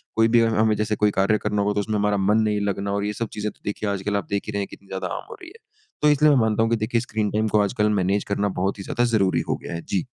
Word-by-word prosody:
कोई 115 0 +4
भी 115 0 +4
हमें 110 -1 +2
जैसे 105 0 -1
कोई 105 0 +2
कार्य 100 +3 +2
करना 105 -1 0
होगा 105 +1 +1
तो 105 - -1
उसमें 105 +1 -2
हमारा 105 0 +1
मन 100 +3 +2
नहीं 105 -1 0
लगना 100 0 -2
और 100 0 -1
ये 105 - -2
सब 115 +2 -3
चीज़ें 105 0 -3
तो - - -28
देखिए 105 +1 -2
आजकल 100 +1 -2
आप 100 - -3
देख 100 0 -1
ही - - -3
रहे 100 -1 -2
हैं 100 - -3
कितनी 100 - -14
ज़्यादा 95 -1 -4
आम - - -7
हो - - -8
रही 355 - -10
है। 460 - -16 0.4
तो 150 - +5
इसलिए 150 +1 +5
मैं 140 - +4
मानता 110 -1 +2
हूँ 115 - +1
कि - - +4
देखिए 115 +1 0
स्क्रीन 110 -3 -2
टाइम 110 +1 0
को 105 0 +2
आजकल 105 +1 +1
मैनेज 100 +1 +1
करना 100 0 0
बहुत 95 +2 0
ही 95 - -5
ज़्यादा 120 - -1
ज़रूरी 105 -5 +2
हो - - +2
गया - - -6
है। 85 - -4
जी। 95 - 0
105 Hz, 310 wpm, -23 LUFS, 100-110 Hz, 0.4 s, तो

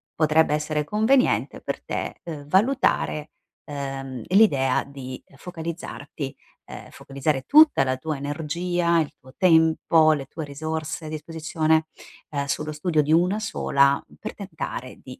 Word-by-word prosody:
potrebbe 155 0 +3
essere 150 0 -1
conveniente 220 - +2
per - - -5
te, - - -4
uhm, 150 -4 -7
valutare, 190 - +1 0.4
uhm, 135 -3 -5
l'idea 145 -10 +4
di, 130 -2 -8
ehm, 135 - -21
focalizzarti, 160 -4 -6 0.3
ehm, - - -10
focalizzare 140 0 -2
tutta 305 - +6
la 130 -1 -1
tua 155 +4 -3
energia, 170 +4 0
il 155 - -1
tuo 130 0 -17
tempo, 160 -2 +4
le 140 -3 -3
tue 160 +2 -6
risorse 155 +2 -4
a - - -6
disposizione, 155 0 0 0.4
ehm, 140 -2 -2
sullo 150 +2 -2
studio 155 +1 +1
di 150 +1 -1
1 180 +5 +3
sola, 140 -10 +2
mhmm, - - -12
per 215 - -6
tentare 160 - -6
di 130 - -10
155 Hz, 140 wpm, -24 LUFS, 140-170 Hz, 0.4 s, tutta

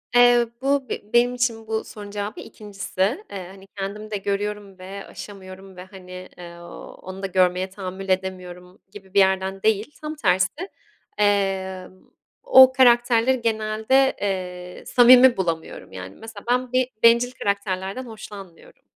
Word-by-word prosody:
Eee, 245 -1 +6
bu 275 -1 0
be 210 - -6
benim 240 +1 +4
için 230 -3 -1
bu 220 0 -2
sorunun 205 -1 -10
cevabı 205 +1 -5
2'ncisi. 205 - -3
Eee, 190 -3 -7
hani 195 +1 -14
kendim 210 +2 -6
de 205 - -1
görüyorum 200 0 -4
ve 195 +2 -8
aşamıyorum 190 -1 -11
ve 180 - -9
hani, 185 -1 -11
eee, 170 -1 -10 0.5
onu 190 +1 -9
da - - -1
görmeye 185 0 +1
tahammül 190 0 -7
edemiyorum 185 -1 -4
gibi 195 -2 -14
bir 200 - +4
yerden 190 0 +1
değil. 220 +4 +1
Tam 305 0 -5
tersi, 295 - 0 0.5
eee, 195 -2 0 0.6
o 260 0 +8
karakterleri 240 -1 +4
genelde, 220 +4 +1
eee, 180 -2 -4
samimi 250 0 +7
bulamıyorum. 165 -3 -4
Yani 95 +1 -9
mesela 220 -2 -11
ben 250 0 0
bir 255 0 +1
bencil 235 +2 +5
karakterlerden 200 +1 -3
hoşlanmıyorum. 205 -5 -12
200 Hz, 140 wpm, -23 LUFS, 190-235 Hz, 0.6 s, o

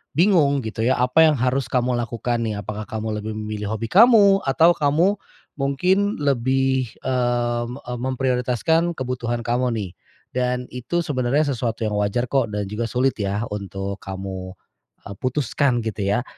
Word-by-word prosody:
bingung 160 -6 +4
gitu 110 0 -3
ya, 130 +3 +3
apa 125 +6 +4
yang 155 - +3
harus 130 +2 0
kamu 125 0 +1
lakukan 120 0 -2
nih. 110 -2 -2
Apakah 105 +1 -5
kamu 110 -1 -3
lebih 110 +1 -5
memilih 105 -1 -4
hobi 115 +1 -4
kamu, 205 -2 +7
atau 165 +5 +5
kamu, 170 +7 +2 0.4
mungkin 185 +10 +1
lebih, 130 -1 +1 0.2
eee, 120 -2 0
e 125 0 -8
m 120 - -7
memprioritaskan 130 +6 0
kebutuhan 120 -3 -3
kamu 120 +1 0
nih. 100 -5 -4 0.4
Dan 125 0 -2
itu 125 +8 -2
sebenarnya 140 +1 0
sesuatu 115 -2 -2
yang 105 -1 -1
wajar 115 +4 -1
kok, 135 -4 +2
dan 105 -1 -3
juga 105 +4 -3
sulit 130 +3 +1
yah 100 +2 -1
untuk 100 -1 -5
kamu, 95 -1 -6 0.5
eee, 100 - -8
putuskan 130 -1 0
gitu 110 -1 -4 0.2
ya. 125 - -1
125 Hz, 160 wpm, -22 LUFS, 110-140 Hz, 0.5 s, kamu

